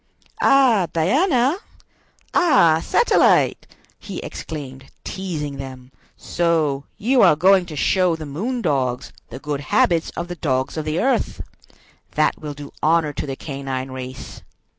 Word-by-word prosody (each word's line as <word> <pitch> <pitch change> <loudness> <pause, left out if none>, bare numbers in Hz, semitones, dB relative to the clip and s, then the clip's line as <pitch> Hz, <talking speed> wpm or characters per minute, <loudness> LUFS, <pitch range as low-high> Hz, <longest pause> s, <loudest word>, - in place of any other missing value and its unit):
"Ah, 245 -9 +4
Diana! 260 - +2 0.8
Ah, 210 - +4
Satellite!" 475 - +3 0.3
he - - -8
exclaimed, 135 -4 -7 0.2
teasing 155 -7 -5
them; 130 -1 -9 0.3
"so 155 -5 0
you 250 +4 +2
are - - +6
going 185 +3 +4
to 155 - -8
show 180 +3 +2
the 160 -1 -7
moon 220 - -3
dogs 130 -6 -1 0.2
the 120 - -8
good 145 +1 -4
habits 165 +4 +2
of 170 - -3
the 175 - -6
dogs 130 -5 -1
of 155 -1 -4
the 155 +2 -1
earth! 265 +2 0 0.7
That - - +1
will 150 -2 -6
do 145 0 -10
honor 155 -1 +2
to 145 - -5
the 135 - -4
canine 135 -2 -5
race! 130 0 -8
155 Hz, 140 wpm, -21 LUFS, 140-185 Hz, 0.8 s, are